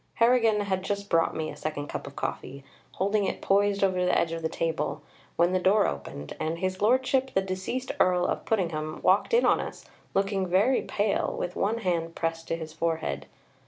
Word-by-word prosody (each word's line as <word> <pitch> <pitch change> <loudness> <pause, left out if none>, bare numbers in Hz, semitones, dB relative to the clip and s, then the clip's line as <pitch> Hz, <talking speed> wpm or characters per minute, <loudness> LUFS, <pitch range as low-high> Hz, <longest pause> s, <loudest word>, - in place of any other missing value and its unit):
Harrigan 230 -3 +4
had 190 -2 -1
just 200 +1 -4
brought 165 -1 +3
me 155 -1 -3
a - - -9
second 150 -2 -4
cup - - -5
of - - -10
coffee, 140 0 -5 0.3
holding 200 +2 +1
it - - -2
poised 200 0 +2
over 185 -2 +2
the 180 - +3
edge 165 - +1
of 165 0 -4
the 160 - -1
table, 155 -3 -2 0.3
when 170 +2 +3
the 185 - +3
door 190 +4 +4
opened, 70 +1 -5
and 160 +1 -2
His 185 +2 -2
Lordship, 260 +4 +2
the 190 - +4
deceased 190 +7 -3
Earl 180 -1 +3
of - - -1
Puddingham, 160 -7 -2
walked 190 +3 +3
in 475 +1 +4
on - - +4
us, - - -6 0.3
looking 195 -1 +1
very 200 +9 +3
pale, 205 0 0
with 180 - -3
one 215 +3 0
hand 170 -5 -1
pressed 165 0 -2
to - - -1
his 160 -1 -7
forehead. 160 - -2
185 Hz, 195 wpm, -27 LUFS, 165-205 Hz, 0.3 s, Harrigan